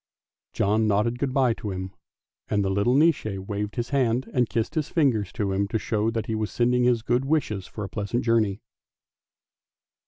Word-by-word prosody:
John 110 Hz, +2 st, +2 dB
nodded 110 Hz, +4 st, +1 dB
good 140 Hz, -2 st, -1 dB
bye 130 Hz, -3 st, +3 dB
to 110 Hz, -, -6 dB
him, 95 Hz, 0 st, -5 dB, 0.6 s
and 100 Hz, -2 st, 0 dB
the 95 Hz, -, 0 dB
little 100 Hz, +6 st, +2 dB
Nisse 160 Hz, +1 st, +4 dB
waved 100 Hz, +2 st, -4 dB
his 120 Hz, 0 st, -3 dB
hand 130 Hz, -2 st, +1 dB
and 125 Hz, -2 st, +2 dB
kissed 115 Hz, -1 st, -1 dB
his 155 Hz, -3 st, -1 dB
fingers 120 Hz, -, +1 dB
to 100 Hz, -2 st, -1 dB
him 100 Hz, +1 st, 0 dB
to 110 Hz, -, -1 dB
show 110 Hz, 0 st, 0 dB
that 115 Hz, -1 st, -2 dB
he 110 Hz, -, -3 dB
was 110 Hz, -1 st, -1 dB
sending 125 Hz, +1 st, +2 dB
his 120 Hz, -2 st, +2 dB
good 120 Hz, +2 st, +1 dB
wishes 135 Hz, -10 st, -1 dB
for 105 Hz, -, -7 dB
a -, -, -3 dB
pleasant 105 Hz, +3 st, -2 dB
journey. 110 Hz, -3 st, +1 dB
115 Hz, 190 wpm, -25 LUFS, 105-125 Hz, 0.6 s, Nisse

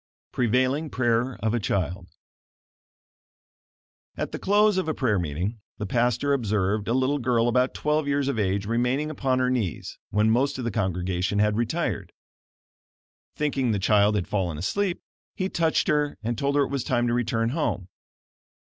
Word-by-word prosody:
PREVAILING 130 Hz, +5 st, +1 dB
PRAYER 120 Hz, 0 st, +1 dB
OF 110 Hz, 0 st, +1 dB
A 120 Hz, -, +1 dB
CHILD 90 Hz, -2 st, -2 dB, 2.1 s
At -, -, -3 dB
the -, -, -5 dB
close 205 Hz, 0 st, +3 dB
of 185 Hz, -, -2 dB
a 155 Hz, -, -1 dB
prayer 110 Hz, -7 st, +1 dB
meeting, 90 Hz, +8 st, -3 dB, 0.2 s
the 105 Hz, -, -4 dB
pastor 120 Hz, +5 st, +1 dB
observed 105 Hz, -4 st, 0 dB
a 115 Hz, -, +1 dB
little 130 Hz, +3 st, +1 dB
girl 120 Hz, -2 st, +2 dB
about 125 Hz, +2 st, +2 dB
twelve 150 Hz, 0 st, 0 dB
years 140 Hz, -1 st, +1 dB
of 140 Hz, -5 st, -1 dB
age 100 Hz, 0 st, 0 dB
remaining 125 Hz, +7 st, 0 dB
upon 130 Hz, -3 st, 0 dB
her 130 Hz, 0 st, +1 dB
knees, 110 Hz, -, -3 dB
when 105 Hz, +2 st, +2 dB
most 135 Hz, +4 st, +1 dB
of 130 Hz, -, -4 dB
the 115 Hz, -, -1 dB
congregation 95 Hz, 0 st, -1 dB
had 105 Hz, 0 st, +3 dB
retired. 120 Hz, -, -2 dB, 1.2 s
Thinking 140 Hz, -4 st, 0 dB
the -, -, +1 dB
child 105 Hz, +2 st, +3 dB
had 95 Hz, -4 st, -1 dB
fallen 90 Hz, -6 st, -1 dB
asleep, 180 Hz, -, -1 dB, 0.3 s
he 185 Hz, 0 st, -2 dB
touched 165 Hz, -3 st, +1 dB
her 150 Hz, -1 st, +1 dB
and 120 Hz, +2 st, -1 dB
told 140 Hz, +5 st, -1 dB
her 145 Hz, -, +4 dB
it 135 Hz, -, -4 dB
was 140 Hz, -3 st, -1 dB
time 120 Hz, -2 st, +1 dB
to 120 Hz, -, +1 dB
return 115 Hz, -1 st, 0 dB
home. 125 Hz, -, -2 dB
120 Hz, 165 wpm, -25 LUFS, 105-140 Hz, 2.1 s, her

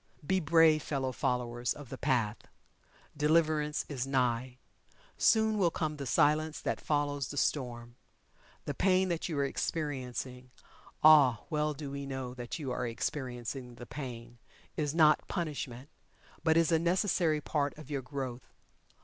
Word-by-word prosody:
Be 190 Hz, +4 st, +2 dB
brave, 160 Hz, -1 st, +5 dB
fellow 135 Hz, -3 st, -2 dB
followers 125 Hz, -2 st, -1 dB
of 145 Hz, -4 st, -11 dB
The 130 Hz, -, -6 dB
Path 120 Hz, -7 st, +1 dB, 0.8 s
Deliverance 150 Hz, -1 st, +2 dB
is 135 Hz, -3 st, -3 dB
nigh. 125 Hz, -1 st, 0 dB, 0.6 s
Soon 220 Hz, -1 st, +3 dB
will 180 Hz, -3 st, +4 dB
come 155 Hz, -2 st, -3 dB
the 140 Hz, -2 st, -5 dB
Silence 155 Hz, +4 st, +2 dB
that -, -, -2 dB
follows 145 Hz, -3 st, 0 dB
the 145 Hz, -, -7 dB
Storm. 120 Hz, -4 st, -1 dB, 0.7 s
The -, -, -2 dB
pain 185 Hz, -1 st, +2 dB
that 170 Hz, 0 st, -2 dB
you 155 Hz, -, -2 dB
are 140 Hz, -, +2 dB
experiencing 130 Hz, -4 st, -3 dB, 0.5 s
ah, 145 Hz, -7 st, +7 dB
well 150 Hz, -1 st, 0 dB
do 140 Hz, -1 st, -6 dB
we 140 Hz, 0 st, -5 dB
know 130 Hz, -2 st, -4 dB
that 120 Hz, +2 st, -6 dB
you 140 Hz, -6 st, -4 dB
are 125 Hz, -, -2 dB
experiencing 125 Hz, +1 st, -4 dB
the 120 Hz, -, -9 dB
pain 120 Hz, -4 st, -8 dB, 0.4 s
is 150 Hz, 0 st, -1 dB
not 155 Hz, -2 st, +5 dB
punishment, 145 Hz, -7 st, -4 dB, 0.6 s
but 160 Hz, 0 st, +4 dB
is 165 Hz, 0 st, +3 dB
a 165 Hz, -, +4 dB
necessary 170 Hz, -2 st, +2 dB
part 145 Hz, -1 st, -1 dB
of 155 Hz, -1 st, -11 dB
your 140 Hz, -2 st, -1 dB
growth. 130 Hz, -2 st, -6 dB
145 Hz, 150 wpm, -31 LUFS, 125-155 Hz, 0.8 s, ah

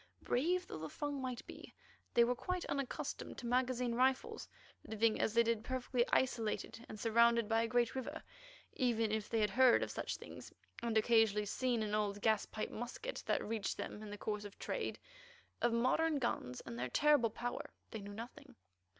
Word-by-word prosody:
Brave 355 Hz, +8 st, +1 dB
though -, -, -7 dB
the 160 Hz, 0 st, -5 dB
Fung 290 Hz, -, -3 dB
might 255 Hz, -2 st, -4 dB
be, -, -, -11 dB, 0.4 s
they 235 Hz, -, +7 dB
were 240 Hz, +1 st, +2 dB
quite 365 Hz, +8 st, -3 dB
unaccustomed 275 Hz, -2 st, -3 dB
to 245 Hz, -, -7 dB
magazine 250 Hz, 0 st, +1 dB
rifles. 265 Hz, -, +1 dB, 0.3 s
Living 220 Hz, 0 st, +1 dB
as 220 Hz, -, 0 dB
they 235 Hz, -, +6 dB
did 230 Hz, -1 st, 0 dB
perfectly 255 Hz, -1 st, 0 dB
isolated 230 Hz, -2 st, 0 dB
and 215 Hz, -, -7 dB
surrounded 235 Hz, 0 st, +4 dB
by 225 Hz, 0 st, +3 dB
a 230 Hz, -, +1 dB
great 240 Hz, 0 st, +2 dB
river, 280 Hz, +4 st, -5 dB, 0.5 s
even 230 Hz, -4 st, +1 dB
if 215 Hz, -1 st, -1 dB
they 225 Hz, -, +1 dB
had 210 Hz, -2 st, +2 dB
heard 255 Hz, +1 st, +6 dB
of -, -, -4 dB
such -, -, -3 dB
things -, -, -10 dB, 0.3 s
and 230 Hz, -1 st, 0 dB
occasionally 220 Hz, -2 st, +4 dB
seen 240 Hz, +2 st, 0 dB
an 210 Hz, -1 st, -3 dB
old 205 Hz, -1 st, 0 dB
gaspipe 215 Hz, 0 st, 0 dB
musket 250 Hz, -, -5 dB
that -, -, +1 dB
reached 215 Hz, -2 st, -2 dB
them 210 Hz, -, -5 dB
in 215 Hz, -, -7 dB
the 205 Hz, -, -6 dB
course 210 Hz, 0 st, -3 dB
of 205 Hz, -1 st, -9 dB
trade, -, -, -3 dB, 0.6 s
of 240 Hz, -, +3 dB
modern 270 Hz, +7 st, +2 dB
guns 125 Hz, -, -2 dB
and 120 Hz, -, -7 dB
their 125 Hz, +1 st, -2 dB
terrible 290 Hz, -, +4 dB
power 240 Hz, +3 st, -4 dB, 0.2 s
they 220 Hz, -, -4 dB
knew 200 Hz, 0 st, -8 dB
nothing. 230 Hz, +3 st, -9 dB
235 Hz, 185 wpm, -36 LUFS, 215-255 Hz, 0.6 s, they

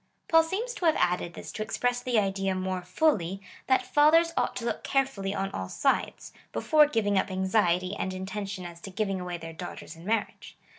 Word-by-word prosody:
Paul 325 Hz, 0 st, +6 dB
seems 405 Hz, +9 st, -3 dB
to 365 Hz, -, -4 dB
have 320 Hz, -, +5 dB
added 175 Hz, -1 st, 0 dB
this -, -, -8 dB
to -, -, -6 dB
express 245 Hz, +3 st, -1 dB
the 245 Hz, -2 st, 0 dB
idea 195 Hz, -2 st, +1 dB
more 185 Hz, 0 st, -2 dB
fully, 190 Hz, -, +1 dB, 0.3 s
that 260 Hz, -1 st, +3 dB
fathers 310 Hz, +5 st, +4 dB
ought -, -, 0 dB
to 235 Hz, -, -4 dB
look -, -, -2 dB
carefully 260 Hz, -8 st, 0 dB
on 195 Hz, 0 st, -2 dB
all 95 Hz, 0 st, -4 dB
sides, 275 Hz, -, -1 dB, 0.2 s
before 305 Hz, -1 st, +4 dB
giving 205 Hz, -7 st, +1 dB
up -, -, -1 dB
anxiety 185 Hz, -1 st, +1 dB
and 190 Hz, -, -2 dB
in 185 Hz, 0 st, -5 dB
tention 195 Hz, -1 st, -5 dB
as 170 Hz, -1 st, -9 dB
to 195 Hz, -, -7 dB
giving 195 Hz, 0 st, -2 dB
away 180 Hz, -1 st, -4 dB
their 165 Hz, -1 st, -8 dB
daughters 175 Hz, 0 st, -8 dB
in 165 Hz, -, -13 dB
marriage. 215 Hz, +2 st, -2 dB
195 Hz, 200 wpm, -28 LUFS, 185-255 Hz, 0.3 s, Paul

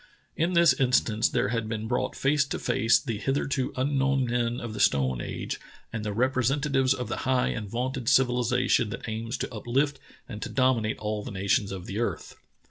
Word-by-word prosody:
In 170 Hz, +3 st, 0 dB
this 170 Hz, -5 st, +6 dB
in 130 Hz, -1 st, 0 dB
stance 110 Hz, -3 st, +3 dB
there 100 Hz, -, 0 dB
had 115 Hz, -2 st, -2 dB
been 110 Hz, -1 st, -3 dB
brought 125 Hz, +2 st, -1 dB
face 140 Hz, +1 st, +2 dB
to -, -, -3 dB
face 115 Hz, +1 st, +3 dB
the 115 Hz, -7 st, -4 dB
hitherto 135 Hz, 0 st, -1 dB
unknown 135 Hz, 0 st, +1 dB
men 120 Hz, 0 st, -1 dB
of 115 Hz, -2 st, -6 dB
the 105 Hz, -, -6 dB
stone 65 Hz, -3 st, +2 dB
age -, -, -5 dB, 0.3 s
and 115 Hz, -2 st, -3 dB
the 105 Hz, -, -2 dB
representatives 130 Hz, +3 st, +1 dB
of 125 Hz, -2 st, -4 dB
the 110 Hz, -, -3 dB
high 130 Hz, -1 st, +1 dB
and 105 Hz, -3 st, -4 dB
vaunted 125 Hz, +2 st, -2 dB
civilization 125 Hz, -3 st, +2 dB
that 115 Hz, -, -6 dB
aims 115 Hz, +3 st, -3 dB
to -, -, -4 dB
up 110 Hz, +1 st, -8 dB
lift 140 Hz, +3 st, +1 dB, 0.3 s
and 105 Hz, -, -8 dB
to -, -, -4 dB
dominate 115 Hz, -3 st, +1 dB
all 105 Hz, 0 st, -3 dB
the -, -, -7 dB
nations 100 Hz, +2 st, 0 dB
of 95 Hz, -2 st, -6 dB
the 100 Hz, -, -4 dB
earth. 120 Hz, -, -3 dB
120 Hz, 200 wpm, -27 LUFS, 110-130 Hz, 0.3 s, this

